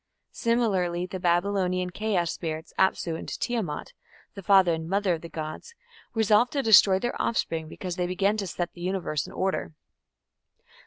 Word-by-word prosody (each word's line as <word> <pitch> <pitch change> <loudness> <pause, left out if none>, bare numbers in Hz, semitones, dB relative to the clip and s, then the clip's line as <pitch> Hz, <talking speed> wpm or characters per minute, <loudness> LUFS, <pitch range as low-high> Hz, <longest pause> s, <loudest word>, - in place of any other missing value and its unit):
Similarly 190 -7 0
the 185 +1 -6
Babylonian 180 0 +1
chaos 185 -4 0
spirits, 160 -1 -5
Apsu 175 -3 +2
and - - -7
Tiamat, 215 -12 -3 0.4
the 195 - -8
father 190 -2 +5
and 160 0 -4
mother 195 -1 +1
of 165 - -4
the 170 - -9
gods, 155 - -7 0.4
resolve 220 +2 +4
to 275 0 -1
destroy 200 -3 +7
their 240 +5 -2
offspring, 165 -8 -1
because 175 +2 -6
they 180 -1 0
begin 195 +3 +1
to 200 -2 -3
set 175 0 -4
the 175 - -12
Universe 175 -5 -2
in - - -10
order. 190 -4 -2
185 Hz, 160 wpm, -26 LUFS, 170-205 Hz, 0.4 s, destroy